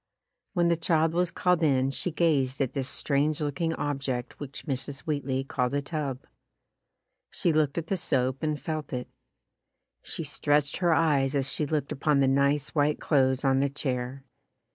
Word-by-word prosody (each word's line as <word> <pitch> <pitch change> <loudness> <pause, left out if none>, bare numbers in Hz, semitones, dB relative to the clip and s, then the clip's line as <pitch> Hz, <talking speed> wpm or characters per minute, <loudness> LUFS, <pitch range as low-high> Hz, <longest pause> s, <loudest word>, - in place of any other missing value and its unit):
When 175 -2 +2
the 170 - +3
child 160 -1 +2
was 175 0 +2
called 180 0 +1
in 135 -4 +3
she 160 - -2
gazed 145 -6 +1
at 135 -3 0
this 135 -1 -2
strange 145 +1 0
looking 160 +2 -1
ob 145 -1 -2
ject 125 -3 -4
which 140 -2 -7
Mrs. 140 -1 -3
Wheatley 140 -3 -1
called 125 0 -1
a 145 - +1
tub. 140 -4 -4 1.0
She 170 - 0
looked 150 -1 +1
at 165 - -1
the 190 +3 -1
soap 130 -5 0
and 155 -1 -1
felt 155 0 -4
it. 125 -1 -3 0.9
She - - -5
stretched 145 0 +1
her 175 -2 +2
eyes 145 -4 +2
as 135 -1 -1
she 150 - -1
looked 150 -2 -1
upon 145 +1 +2
the 135 - +4
nice 140 +2 +2
white 150 -1 +2
clothes 130 -2 +2
on 135 0 +4
the 140 +1 +2
chair. 130 -1 -3
145 Hz, 175 wpm, -28 LUFS, 135-155 Hz, 1.0 s, the